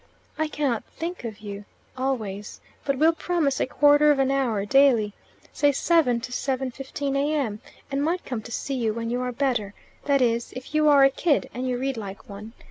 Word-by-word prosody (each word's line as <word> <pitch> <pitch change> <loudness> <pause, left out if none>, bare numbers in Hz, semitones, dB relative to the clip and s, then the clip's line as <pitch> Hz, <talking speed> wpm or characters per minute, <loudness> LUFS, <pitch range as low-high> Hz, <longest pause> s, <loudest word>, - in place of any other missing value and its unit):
I 315 -1 0
cannot 280 -7 -1
think 345 -1 -6
of 220 -3 -7
you 205 -1 -7 0.3
always, 220 -7 -3 0.3
but 275 -1 0
will 320 +4 +4
promise 325 -5 0
a - - +1
quarter 290 +2 +5
of 295 - +4
an 270 0 +2
hour 240 -7 0
daily 235 -4 +4 0.4
(say 290 - +3
7.00 280 -4 +2
7.15 265 +2 -3
A.M.), 275 -7 0 0.3
and 275 0 0
might 345 +4 -1
come 245 -4 -4
to 235 - -11
see 275 - -3
you 230 -4 -1
when 230 0 -3
you 245 +1 -1
are 250 0 -2
better 235 -6 -1 0.3
that 280 -1 +3
is, 235 -2 0
if 255 +3 -9
you 305 0 +4
are 280 -2 +7
a 270 - +6
kid, 295 +1 0
and 255 +2 -3
you 250 -1 -1
read 265 0 -2
like 200 -2 -8
one. 210 +2 -9
265 Hz, 195 wpm, -25 LUFS, 230-285 Hz, 0.4 s, are